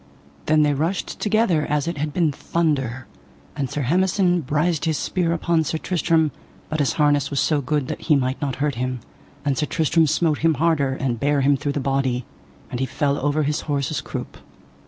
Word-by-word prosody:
Then 155 0 +4
they 145 -1 +2
rushed 165 +7 -2
together 210 -7 +2
as 150 +1 0
it 170 -3 -3
had 150 +1 -1
been 165 -1 +1
thunder, 135 -6 -1 0.5
and 140 -3 -2
Sir 145 - -2
Hemison 180 +4 +2
brised 155 +4 0
his 160 -2 +1
spear 175 -3 0
upon 170 -1 +1
Sir 160 - -2
Tristram, 165 -2 +1 0.4
but 155 - -2
his 140 -6 +2
harness 145 -2 +2
was 140 - -1
so 150 -3 +2
good 140 0 -1
that - - -5
he 155 - +3
might 130 +1 -1
not 140 -3 -1
hurt 145 +1 0
him. 130 0 -2 0.5
And 140 -2 +1
Sir 150 - -1
Tristram 160 0 +2
smote 155 0 +1
him 160 -1 +3
harder, 150 -4 +1
and 125 -4 -2
bare 145 +1 +2
him 140 +1 +4
through 140 +1 -2
the 145 - -1
body, 135 -3 0 0.5
and 120 - -3
he 130 - 0
fell 140 +3 0
over 145 +1 +1
his 150 +2 -1
horse's 140 0 -1
croup. - - -6
150 Hz, 200 wpm, -22 LUFS, 140-160 Hz, 0.5 s, Then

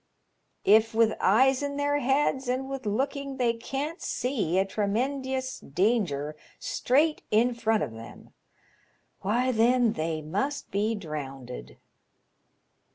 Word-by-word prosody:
If, 220 +2 +5
with 225 -1 +4
eyes 260 +7 +4
in 285 0 -3
their 290 0 +1
heads 270 0 +1
and 260 +2 -1
with 270 -4 -5
look 260 +8 0
ing 275 -1 -5
they 240 -2 +2
can't 275 +8 -4
see 220 - -1
a 190 - +3
tremendious 260 +6 -2
danger 155 - 0 0.2
straight 300 +5 +1
in 235 +3 +3
front 225 -2 +1
of 135 - -4
them, 115 +1 -12 0.9
why, 240 +6 +1
then, 240 0 +3
they 155 0 -2
must 205 - -3
be 210 +3 0
drownded." 135 - -7
230 Hz, 125 wpm, -27 LUFS, 195-265 Hz, 0.9 s, If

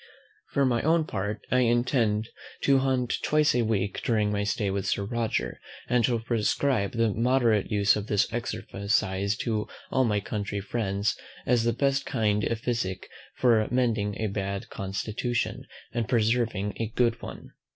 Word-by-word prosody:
For 140 - +2
my 120 -3 +2
own 160 +1 +3
part 105 -3 -4
I 125 - +4
intend 120 -3 +2 0.3
to 135 -1 +4
hunt 130 -2 0
twice 150 0 +3
a 120 - +2
week 105 -3 -1
during 105 -3 +1
my 105 0 0
stay 100 0 0
with 95 0 -2
Sir 100 - 0
Roger; 115 +1 -2 0.3
and 120 -1 +2
shall 120 +1 +2
prescribe 115 -1 0
the 115 -2 +1
moderate 115 -3 +2
use 100 -1 +3
of 105 0 -4
this 105 -2 +3
exercise 100 -3 -1
to 110 -3 -1 0.2
all 130 - +3
my 105 -4 +1
country 100 -1 -3
friends 100 -1 -1 0.3
as 120 -2 +2
the 115 - +3
best 140 +3 +1
kind 105 -5 +1
of 115 - -1
physick 95 -7 -2 0.3
for 115 -4 +3
mending 115 -5 0
a 110 - 0
bad 100 -1 -3
constitution, 110 +5 -2 0.3
and 115 -2 -2
preserving 115 -3 +1
a 115 - 0
good 120 -1 +2
one. - - -9
110 Hz, 160 wpm, -27 LUFS, 105-120 Hz, 0.3 s, I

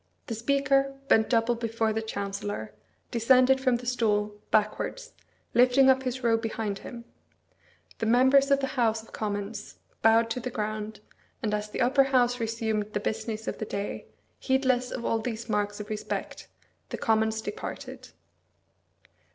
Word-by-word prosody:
The 230 - -4
Speaker, 275 +3 +1
bent 220 0 +4
double 230 0 +3
before 225 -1 -1
the 220 - -1
Chancellor, 200 - -4 0.4
descended 255 +3 +4
from 255 -2 +3
the 240 +1 -5
stool, 210 -4 +1 0.2
backwards, 215 - -1 0.4
lifting 255 +2 +6
up 260 0 +2
his 255 0 -4
robe 225 -1 +3
behind 220 -3 -3
him; 235 -1 -9 0.9
the 225 - -1
members 260 +4 +5
of 275 0 +3
the 270 -1 -2
House 225 -1 +1
of - - -19
Commons 205 0 -4 0.3
bowed 225 +1 +4
to 250 - -1
the 250 - -4
ground, 215 -2 -4 0.4
and 210 -2 0
as 210 0 -2
the - - -4
Upper 270 +3 +4
House 250 -2 +2
resumed 220 -2 -2
the - - 0
business 220 +1 -3
of - - -3
the 215 - -2
day, 200 0 -5 0.3
heedless 260 -2 +1
of 235 - -5
all 225 - +1
these 230 0 -4
marks 205 -1 -1
of 210 - -6
respect, 215 - -4 0.4
the - - -4
Commons 220 -1 +1
departed. 415 - -7
225 Hz, 155 wpm, -27 LUFS, 215-250 Hz, 0.9 s, lifting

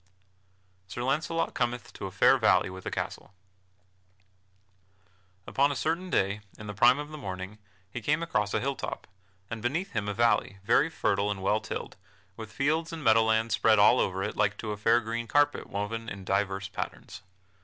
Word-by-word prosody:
[Sidenote: - - -18
Sir 120 - -4
Launcelot 160 +5 0
cometh 120 0 -2
to - - -6
a - - -8
fair - - +4
valley - - +3
with 95 0 -9
a - - 0
castle] 95 - -5 2.1
Upon 140 +1 +2
a - - -3
certain 165 +6 -1
day, 100 - +1 0.2
in 110 - -9
the 105 - -5
prime 115 +6 +5
of 145 0 -5
the 155 0 -8
morning, 95 -2 -6 0.3
he 120 - -5
came 150 +9 +1
across 105 -11 0
a - - +2
hilltop, 135 +1 -4 0.4
and 115 +1 -6
beheld 120 +4 -1
beneath 185 +5 -2
him 110 -2 -2
a 100 - -3
valley, 115 -3 +2
very 120 +9 +3
fertile 100 -9 0
and 100 -2 -3
well 105 +2 +2
tilled, - - -6 0.4
with 110 -2 -9
fields 155 +6 0
and 165 -2 -6
meadow 115 -2 +5
lands 110 0 +1
spread 110 +1 +4
all 105 +5 +6
over 95 0 0
it 105 - -3
like 105 0 +1
to 110 - -4
a - - -2
fair 115 +3 +3
green 115 +1 -4
carpet 145 +2 +2
woven 115 +3 -4
in 100 -1 -7
divers 95 0 0
patterns. - - -7
110 Hz, 190 wpm, -28 LUFS, 100-140 Hz, 2.1 s, all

